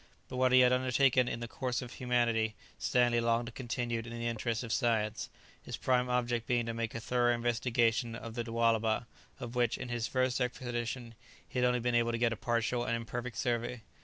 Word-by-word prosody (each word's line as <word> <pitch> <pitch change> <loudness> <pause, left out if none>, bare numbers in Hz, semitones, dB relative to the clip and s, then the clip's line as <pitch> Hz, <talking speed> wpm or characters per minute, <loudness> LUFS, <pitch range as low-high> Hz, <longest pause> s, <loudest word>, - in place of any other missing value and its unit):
But 125 - -5
what 130 0 +3
he 130 0 +7
had 125 0 +5
undertaken 130 0 +3
in 120 - -3
the 120 - -4
course 125 0 -2
of 120 - -9
humanity 115 -3 +1 0.2
Stanley 120 -1 +3
longed 115 0 +1
to 120 - -7
continue 120 -1 -2
in 115 +1 -7
the 115 0 -5
interests 115 +1 -1
of 115 -1 -3
science, 110 -4 0 0.3
his - - -6
prime 125 -1 +1
object 120 -2 0
being 120 -1 +1
to 115 - -3
make 115 -1 -3
a - - -2
thorough 120 +1 +2
investigation 115 0 +1
of 115 0 -7
the 120 0 -2
Lualaba, 115 -1 +1 0.3
of 120 -1 -6
which, 120 -2 +1
in 125 - -6
his 120 -1 -1
first 130 +1 0
expedition, 120 -1 -3 0.3
he 125 - -3
had 125 - +4
only 125 0 +2
been 120 +1 0
able 115 0 +2
to - - 0
get 115 0 +2
a - - -4
partial 120 +1 0
and 115 - 0
imperfect 120 0 -5
survey. 120 -1 -1
120 Hz, 210 wpm, -32 LUFS, 115-125 Hz, 0.3 s, he